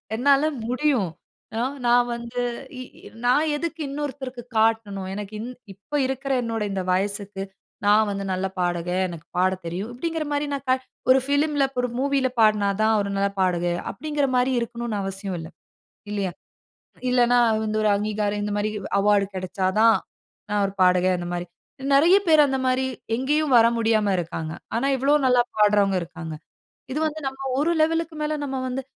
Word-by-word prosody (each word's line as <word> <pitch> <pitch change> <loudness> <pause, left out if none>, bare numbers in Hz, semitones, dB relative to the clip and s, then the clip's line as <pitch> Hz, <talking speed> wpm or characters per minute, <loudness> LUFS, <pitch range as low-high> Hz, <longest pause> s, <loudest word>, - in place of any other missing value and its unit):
என்னால 275 +4 +4 0.2
முடியும். 255 - +1 0.5
அ - - +1 0.3
நான் 240 0 +4
வந்து 235 +1 -5 0.4
இ - - -5 0.2
இ - - -12 0.2
நான் 295 +5 +3
எதுக்கு 330 +2 -4
இன்னொருத்தருக்கு 275 -3 -5
காட்டணும். 220 -3 +1
எனக்கு 205 +1 -6
இன் 230 +3 -5 0.2
இப்போ 200 +10 -8
இருக்கிற 270 +1 -3
என்னோட 225 -2 -2
இந்த 195 -1 -2
வயசுக்கு, 200 +1 -1 0.4
நான் 210 +1 +5
வந்து 200 0 -3
நல்ல 185 +1 -1
பாடகன். 175 +1 0
எனக்கு 170 -2 -9
பாடத் 185 0 +1
தெரியும்." 190 +7 -4
அப்படிங்கிற 325 +4 -3
மாரி, 290 0 0
நான் 260 -1 0 0.3
ஒரு 260 - +6
ஃபிலிம்ல 285 0 +2 0.3
மூவில 275 -1 +1
பாடினா 210 -2 +4
தான், 220 0 +4
ஒரு 200 - -3
நல்ல 200 0 +2
பாடகையா, 175 -1 0
அப்பிடீங்கிற 295 -2 -1
மாரி 250 +1 +2
இருக்கணும்னு 235 -2 -3
அவசியம் 195 -1 -4
இல்லை. 160 0 -8 0.6
இல்லையா? 195 -3 -1 0.8
இல்லைன்னா 245 -1 +4 0.3
வந்து 215 0 -1
ஒரு - - +3
அங்கீகாரம் 210 0 -1
இந்த 210 - -2
மாதிரி 205 +1 0 0.3
அவார்ட் 200 -1 +2
கிடைச்சா 185 +1 -3
தான், 225 -1 +6 0.5
நான் 205 0 +1
ஒரு 195 - -4
பாடகன், 185 0 +4
அந்த 175 - -5
மாரி. 175 0 -3 0.5
நெறைய 335 +7 +6
பேரு, 310 -2 +7
அந்த 270 -1 0
மாரி, 255 0 +2 0.3
எங்கேயும் 290 +3 +1
வர 230 0 +7
முடியாம 220 -3 +2
இருக்கிறாங்க. 165 -2 -4 0.2
ஆனா, 245 +4 +1
எவ்வளவோ 275 +3 +3
நல்லா 250 -1 +5 0.2
பாடுறவங்க 205 -2 +4
இருக்காங்க. 165 -2 -7 0.6
இது 285 - -1
வந்து 310 0 -4
நம்ம 270 0 -4 0.2
ஒரு 305 +4 +2
லெவல்‌க்கு 325 0 0
மேல, 300 0 -1
நம்ம 270 -1 -3
வந்து 260 +1 -3
225 Hz, 160 wpm, -24 LUFS, 195-270 Hz, 0.8 s, பேரு